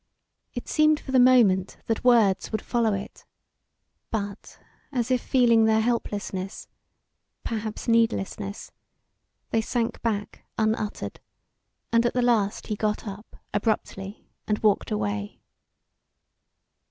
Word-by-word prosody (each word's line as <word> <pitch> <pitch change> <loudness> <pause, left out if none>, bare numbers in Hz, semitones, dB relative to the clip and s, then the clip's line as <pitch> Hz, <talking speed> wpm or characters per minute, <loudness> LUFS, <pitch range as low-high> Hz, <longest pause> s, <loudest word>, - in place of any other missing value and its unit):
It 245 - -5
seemed 305 -1 +3
for 265 - -8
the 260 - +5
moment 225 -7 +4
that 225 - -1
words 225 -6 +4
would 215 - -2
follow 235 -3 +1
it, 195 - -8 0.9
but 205 -2 -5 0.3
as 250 -2 -1
if 255 - +2
feeling 235 -3 +4
their 220 0 +4
helplessness 205 -4 -2 0.8
perhaps 220 0 -4
needlessness 220 -3 0 0.8
they 225 - +2
sank 230 +1 -2
back 210 -3 -3
unuttered, 215 -1 -1 0.7
and 230 0 +5
at 240 - -3
the 250 - +2
last 220 -4 +1
he 215 - -2
got 210 +1 -2
up, 200 +2 -9 0.2
abruptly, 205 -1 -2 0.2
and 210 - +1
walked 210 -2 +3
away. 105 -1 -3
220 Hz, 115 wpm, -26 LUFS, 200-235 Hz, 0.9 s, the